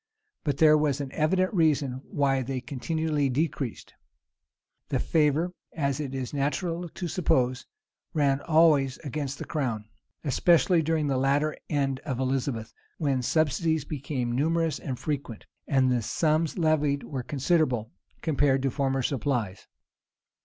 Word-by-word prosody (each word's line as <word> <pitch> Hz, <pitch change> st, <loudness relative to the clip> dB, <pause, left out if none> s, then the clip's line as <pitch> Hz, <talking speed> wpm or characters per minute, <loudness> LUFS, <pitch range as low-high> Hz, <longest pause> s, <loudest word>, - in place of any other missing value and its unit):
But 145 Hz, -3 st, -1 dB
there 155 Hz, -1 st, +6 dB
was 150 Hz, -2 st, +1 dB
an 140 Hz, -2 st, -4 dB
evident 185 Hz, +7 st, +1 dB
reason 145 Hz, -7 st, +1 dB
why 135 Hz, -2 st, +1 dB
they 130 Hz, +1 st, -3 dB
continually 145 Hz, +3 st, -1 dB
decreased. 135 Hz, -3 st, -2 dB, 1.0 s
The -, -, +1 dB
favor, 160 Hz, +3 st, +1 dB, 0.2 s
as 140 Hz, -3 st, 0 dB
is 135 Hz, -3 st, -4 dB
natural 165 Hz, +5 st, -1 dB
to 175 Hz, +2 st, -5 dB
suppose, 130 Hz, -, +1 dB, 0.4 s
ran 140 Hz, -2 st, +1 dB
always 155 Hz, -5 st, +4 dB
against 140 Hz, -1 st, -4 dB
the -, -, -6 dB
crown; 120 Hz, -8 st, -2 dB, 0.4 s
especially 170 Hz, +4 st, +3 dB
during 160 Hz, -1 st, 0 dB
the 135 Hz, -2 st, +1 dB
latter 145 Hz, +3 st, +1 dB
end 135 Hz, -3 st, 0 dB
of 130 Hz, -3 st, -4 dB
Elizabeth, 130 Hz, -3 st, -2 dB, 0.2 s
when 140 Hz, -4 st, 0 dB
subsidies 160 Hz, +2 st, +1 dB
became 135 Hz, -4 st, -3 dB
numerous 160 Hz, +4 st, +1 dB
and 130 Hz, -4 st, -4 dB
frequent, 140 Hz, -7 st, -4 dB, 0.2 s
and 130 Hz, -3 st, +3 dB
the 125 Hz, -1 st, +1 dB
sums 155 Hz, -, 0 dB
levied 150 Hz, -4 st, +2 dB
were 135 Hz, -4 st, -4 dB
considerable, 135 Hz, -4 st, 0 dB, 0.3 s
compared 140 Hz, -3 st, +2 dB
to 135 Hz, -, +1 dB
former 135 Hz, -1 st, 0 dB
supplies. 120 Hz, -7 st, -2 dB
140 Hz, 130 wpm, -27 LUFS, 130-155 Hz, 1.0 s, there